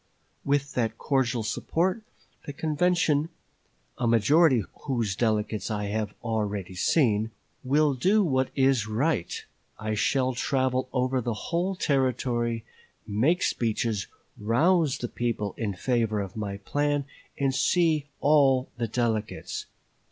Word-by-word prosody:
With 140 0 0
that 115 -2 -1
cordial 125 -4 0
support 180 - -1 0.5
the 145 - -4
convention 160 0 +1 0.7
(a 120 - +1
majority 130 +4 +4
of - - -10 0.2
whose 115 -8 -1
delegates 110 -2 0
I 105 -1 -2
have 105 0 -2
already 105 -5 -2
seen) 110 - +2 0.3
will 145 +2 +3
do 195 - +3
what 130 -6 +1
is 130 -5 +3
right. 110 - -1 0.3
I 110 0 -3
shall 130 +4 +1
travel 130 0 0
over 130 0 0
the 120 -1 -2
whole 175 - -2
Territory, 125 -6 0 0.4
make 125 - +1
speeches, 110 -2 0 0.3
rouse 150 - +2
the 120 - -3
people 115 -5 -2
in 105 -4 -3
favor 115 0 0
of 95 -2 -5
my 100 -2 -4
plan, 145 +6 -1 0.3
and 135 -1 +1
see 155 0 +2
all 135 -3 +4
the 120 -1 -1
delegates. 110 -2 -2
125 Hz, 125 wpm, -27 LUFS, 110-145 Hz, 0.7 s, majority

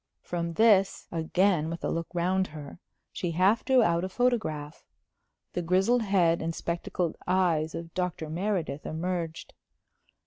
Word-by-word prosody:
From 170 -1 -3
this 200 -1 +3
again 170 0 +1
with 170 0 -6
a - - 0
look 165 0 -2
round 185 +2 +1
her 150 +1 -10 0.3
she 175 - -3
half 190 +6 +3
drew 260 -3 +4
out 170 -2 +2
a 185 - -2
photograph. 185 -11 -1 0.7
The 180 - -1
grizzled 190 +8 +2
head 180 -5 +2
and 165 0 -2
spectacled 170 0 -2
eyes 170 -4 +1
of 165 0 -7
Dr. 180 -3 -2
Meredith 165 -3 -2
emerged. 165 0 -4
175 Hz, 140 wpm, -28 LUFS, 165-190 Hz, 0.7 s, drew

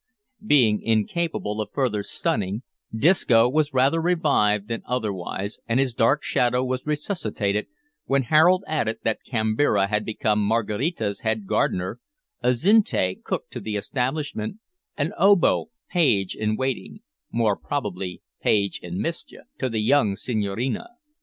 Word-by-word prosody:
Being 125 - +4
incapable 110 -1 -1
of 105 - -5
further 125 -7 0
stunning, 105 - -2 0.3
Disco 120 -3 +4
was 150 +3 +1
rather 135 +5 +2
revived 140 - +2
than 115 +1 -3
otherwise, 100 -4 -3
and 115 +2 +1
his 135 -3 +1
dark 130 +5 +2
shadow 125 +1 +1
was 130 +2 -3
resuscitated, 110 - -1 0.4
when 135 0 +2
Harold 165 +8 +4
added 115 -8 -1
that 110 - 0
Kambira 110 -3 +1
had 105 0 0
become 105 -1 0
Maraquita's 110 - -1
head 110 -2 -1
gardener, 95 +3 -1 0.4
Azinte 125 - +2
cook - - -3
to - - -5
the 110 -1 -4
establishment, 130 - -2 0.4
and - - -1
Obo 200 +1 +4 0.2
page 110 - +2
in 110 0 -1
waiting 135 - -3 0.3
more 115 -3 +2
probably 95 -11 -4 0.2
page 100 -2 +1
in 90 +1 -5
mischief 165 +1 -4 0.2
to 130 - -1
the 110 -2 -1
young 110 -5 +3
Senhorina. 110 +2 -2
115 Hz, 130 wpm, -24 LUFS, 105-145 Hz, 0.4 s, Being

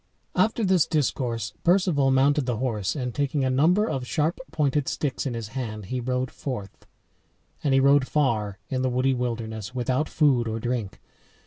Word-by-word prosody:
After 220 0 +2
this 185 -4 +3
discourse 120 -7 -1
Perceval 175 -6 +3
mounted 135 +1 +3
the 120 -3 0
horse 110 -5 -1
and 125 -4 -3
taking 140 -1 0
a 130 - +1
number 175 +11 +3
of 130 - -3
sharp 155 +4 0
pointed 145 -3 0
sticks 140 -1 -2
in 125 - -3
his 115 -2 -5
hand 110 -5 -5
he 130 - 0
rode 125 +1 -2
forth. 110 -8 -7 0.8
And 145 - +1
he 135 - +5
rode 140 0 +4
far 110 -9 0
in 130 -3 -2
the 130 - +1
woody 130 +2 +1
wilderness 115 -2 -4
without 130 +4 0
food 135 -7 +2
or 110 0 -2
drink. 120 -4 -3
130 Hz, 175 wpm, -25 LUFS, 120-145 Hz, 0.8 s, he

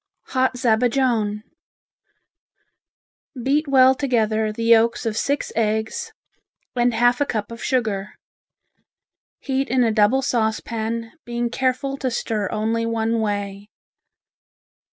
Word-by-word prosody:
Hot 260 -1 +1
Zabajone 230 -3 +1 2.0
Beat 285 +5 +1
well 260 -1 +6
together 220 -5 0
the 230 +2 -5
yolks 230 +1 +3
of 220 -2 -1
six 280 +5 -1
eggs, 220 -1 -1 0.6
and 240 -1 +2
half 245 +3 +3
a - - +4
cup 215 -1 -3
of 230 - -8
sugar. 215 -6 -1 1.3
Heat 270 0 -1
in 255 0 +3
a 230 - +2
double 220 +5 +3
saucepan, 225 -1 -2
being 240 0 -3
careful 265 +2 -1
to 260 - -2
stir 215 -4 -2
only 225 +2 -1
one 230 0 0
way. 205 -1 -3
230 Hz, 110 wpm, -22 LUFS, 220-255 Hz, 2.0 s, well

